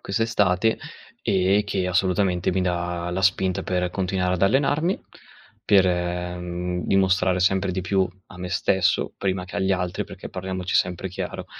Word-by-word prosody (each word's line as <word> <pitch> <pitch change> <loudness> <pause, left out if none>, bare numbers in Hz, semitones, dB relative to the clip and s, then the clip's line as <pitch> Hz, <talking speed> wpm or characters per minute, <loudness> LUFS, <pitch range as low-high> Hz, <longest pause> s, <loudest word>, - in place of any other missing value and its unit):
questa 100 +3 -1
estate, 105 -1 +2 0.4
e 95 +2 +3
che 95 -3 -1
assolutamente 90 0 +1
mi 95 0 +1
dà 85 -1 -2
la 95 +2 -2
spinta 95 0 +2
per 90 -1 -1
continuare 90 -1 0
ad 90 - -3
allenarmi, 145 - +2 0.6
per, 95 -2 +5
mhmm, 90 0 -2
dimostrare 95 -1 +3
sempre 95 +1 +2
di 95 - -2
più 95 0 +1 0.2
a 90 - -13
me 90 0 -5
stesso, 95 +1 +1
prima 95 -2 -1
che 90 - -8
agli 95 0 +1
altri 90 -1 -2
perché, - - -9
parliamoci 95 0 -4
sempre 90 +1 +1
chiaro: 90 - -5
95 Hz, 155 wpm, -24 LUFS, 90-95 Hz, 0.6 s, per